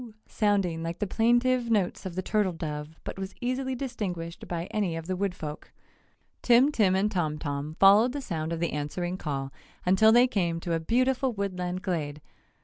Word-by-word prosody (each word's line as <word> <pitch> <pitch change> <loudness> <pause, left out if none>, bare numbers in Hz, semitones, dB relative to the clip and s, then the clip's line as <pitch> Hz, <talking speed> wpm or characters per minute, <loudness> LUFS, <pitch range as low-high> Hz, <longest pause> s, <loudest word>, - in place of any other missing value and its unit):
sounding 195 -6 +1
like 165 +1 -4
the - - -1
plaintive 240 +3 +2
notes 200 -3 0
of 175 - -8
the 185 - -2
turtle 210 -2 +1
dove 155 -1 -6
but - - -6
was 190 0 -6
easily 255 +1 -2
distinguished 190 -10 -5
by 170 -1 -3
any 200 -6 -1
of 165 0 -5
the 185 +2 -2
woodfolk. 180 -6 -4 0.7
Tim 250 +4 +5
Tim 200 -9 +3
and 205 +2 +1
Tom 155 -5 -1
Tom 145 0 -4
followed 205 +5 +7
the 285 - -4
sound 165 - -4
of 165 - -2
the 170 - -1
answering 175 +5 -3
call 135 -5 -4 0.3
until 190 +4 +5
they 240 +2 +7
came 175 -9 0
to 170 - -2
a 165 - +1
beautiful 255 +7 +1
woodland 185 -2 -3
glade. 150 -6 -2
185 Hz, 180 wpm, -28 LUFS, 165-225 Hz, 0.7 s, followed